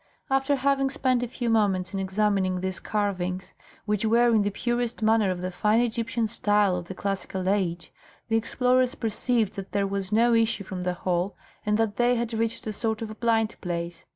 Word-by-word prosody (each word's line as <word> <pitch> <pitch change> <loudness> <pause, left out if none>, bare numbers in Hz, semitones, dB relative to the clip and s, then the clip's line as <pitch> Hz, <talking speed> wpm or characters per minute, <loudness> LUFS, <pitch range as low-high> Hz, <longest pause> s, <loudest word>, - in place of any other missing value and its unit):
After 270 +1 +2
having 275 0 +1
spent 260 -3 +1
a 245 - -1
few 240 0 -4
moments 200 -4 +1
in 195 - -2
examining 190 -1 +1
these 190 -1 -2
carvings, 190 -3 -2 0.3
which 210 0 0
were 235 +2 +4
in 220 - +4
the 205 - +1
purest 240 +2 -2
manner 220 -2 +3
of 180 -1 -2
the 185 0 -3
fine 210 +5 +2
Egyptian 235 0 0
style 205 -3 +2
of 175 -1 -4
the 190 - -7
classical 190 -1 -3
age, 175 -5 -1 0.3
the 225 - 0
explorers 250 +3 +2
perceived 225 -1 0
that 195 -1 -7
there 200 -1 +1
was 195 0 -3
no 235 +2 +4
issue 225 -3 +2
from 190 -1 -6
the 180 0 -1
hall, 180 +1 -1 0.3
and 210 0 +3
that 220 -2 0
they 245 0 +3
had 235 -1 -2
reached 225 0 -1
a 215 - -3
sort 220 +1 -2
of 215 -1 -7
blind 225 -2 +1
place. 170 -1 -4
215 Hz, 195 wpm, -26 LUFS, 190-235 Hz, 0.3 s, were